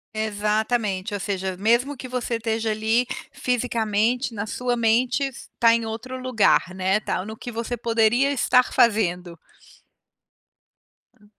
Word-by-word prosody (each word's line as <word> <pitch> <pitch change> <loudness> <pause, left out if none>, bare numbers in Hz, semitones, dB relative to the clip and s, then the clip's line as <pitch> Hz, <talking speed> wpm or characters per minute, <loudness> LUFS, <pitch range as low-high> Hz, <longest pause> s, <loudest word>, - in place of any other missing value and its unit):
Exatamente, 215 -1 -1
ou - - -3
seja, 190 -1 -3
mesmo 235 +8 +1
que 255 - -7
você 250 -1 -2
esteja 225 0 -2
ali 220 +3 +1 0.2
fisicamente, 235 0 0
na 205 -2 -4
sua 245 +2 -2
mente, 245 +4 +1 0.3
tá 230 -1 +6
em 230 -1 0
outro 235 +4 -6
lugar, 250 -7 +3
né, 190 +2 +1
tá 185 -3 -3
no 220 +1 -7
que 245 +2 -8
você 230 +1 -3
poderia 235 +3 +2
estar 250 -1 +3
fazendo. 180 -7 +1 1.8
Hã. 210 - -22
225 Hz, 130 wpm, -23 LUFS, 210-245 Hz, 1.8 s, tá